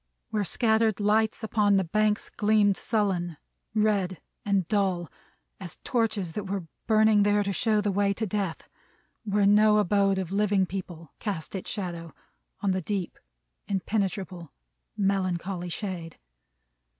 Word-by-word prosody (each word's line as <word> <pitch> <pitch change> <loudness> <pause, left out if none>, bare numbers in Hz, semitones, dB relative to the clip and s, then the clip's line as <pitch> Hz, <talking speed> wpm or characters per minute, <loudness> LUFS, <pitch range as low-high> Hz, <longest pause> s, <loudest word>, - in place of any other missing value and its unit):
Where 210 -2 0
scattered 220 +2 +2
lights 215 +2 +2
upon 210 -2 +2
the 190 - +2
banks 210 +4 0
gleamed 210 -2 +3
sullen, 185 -7 -1 0.4
red 200 -4 +1 0.2
and 200 -4 +1
dull, 190 -6 0 0.5
as 180 -4 -5
torches 220 -7 0
that 200 +3 -5
were 195 -2 -3 0.2
burning 220 -1 +5
there 205 0 +3
to 200 0 -2
show 215 +2 +2
the 205 -1 0
way 200 +1 +2
to 220 - -2
Death. 195 -4 -3 0.6
Where 205 -1 +2
no 210 +1 +5
abode 200 -1 +3
of 185 -2 -3
living 200 -1 +2
people 175 -4 -7
cast 195 -7 -4
its 190 - -5
shadow, 170 -4 -5 0.5
on 200 - +1
the 185 0 0
deep, 190 0 -3 0.5
impenetrable, 190 -4 -2 0.5
melancholy 185 -2 -1
shade. 175 -3 -5
200 Hz, 135 wpm, -27 LUFS, 185-210 Hz, 0.6 s, burning